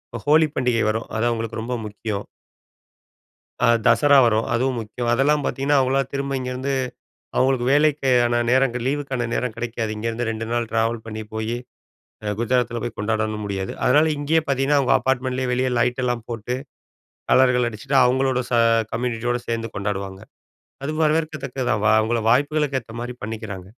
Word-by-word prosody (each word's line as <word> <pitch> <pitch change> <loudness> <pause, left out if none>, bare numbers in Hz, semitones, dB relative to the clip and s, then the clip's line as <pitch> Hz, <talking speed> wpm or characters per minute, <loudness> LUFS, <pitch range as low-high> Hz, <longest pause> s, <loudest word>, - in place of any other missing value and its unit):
ஹ் 115 - -6
ஹோலி 155 +1 +5
பண்டிகை 125 -3 +1
வரும், 110 +1 -2
அது 115 +2 +1
அவங்களுக்கு 115 -1 -3
ரொம்ப 125 +2 -3
முக்கியம். 105 -1 -5 1.4
அ - - +4 0.2
தசரா 145 -1 +5
வரும், 110 -1 +2
அதுவும் 125 +2 0
முக்கியம். 115 +2 -4
அதெல்லாம் 145 +4 +2
பாத்தீங்கன்னா, 140 +2 +1
அவங்களலா 135 +1 +2
திரும்ப 140 0 -2
இங்கேருந்து 130 +2 -3 0.6
அவங்களுக்கு 130 -2 +2
வேலைக்கான 135 -5 +3
நேரம் 130 0 +3
லீவுக்கான 135 -4 -2
நேரம் 125 -3 -2
கிடைக்காது. 115 -1 -3
இங்க 105 - -6
இருந்து 115 +1 -3
2 110 0 -3
நாள் 120 -1 -1
ட்ராவல் 115 0 0
பண்ணி 110 -1 -6
போயி, 110 +2 -2 0.7
அ 105 -1 -1
குஜராத்துல 120 -1 0
போய் 120 - -4
கொண்டாடணும் 110 0 -1
முடியாது. 95 -1 -3
அதனால 155 +2 +4
இங்கேயே 155 +3 +1
பாத்தீங்கன்னா, 140 +2 +2
அவங்க 130 - +2
அப்பார்ட்மெண்ட்லேயே 130 -1 -1
வெளிய 130 +1 +1
லைட்டெல்லாம் 120 -1 0
போட்டு 120 +1 -3 0.8
கலர்கள் 125 -2 +4
அடிச்சுட்டு 135 +5 -2
அவங்களோட 130 0 +2
ச - - -1 0.4
கம்யூனிட்டியோடு 120 0 -1
சேந்து 115 -1 -2
கொண்டாடுவாங்க. 100 -1 -4 0.6
அது 150 - -2
வரவேற்கத்தக்கது 150 -4 -1
தான். 110 0 +1
அவங்கள 115 +2 +1
வாய்ப்புகளுக்கு 145 +2 +2
ஏத்த 115 -1 -14
மாதிரி 120 +1 -4
பண்ணிக்கிறாங்க. 105 -4 -6
120 Hz, 150 wpm, -22 LUFS, 115-135 Hz, 1.4 s, ஹோலி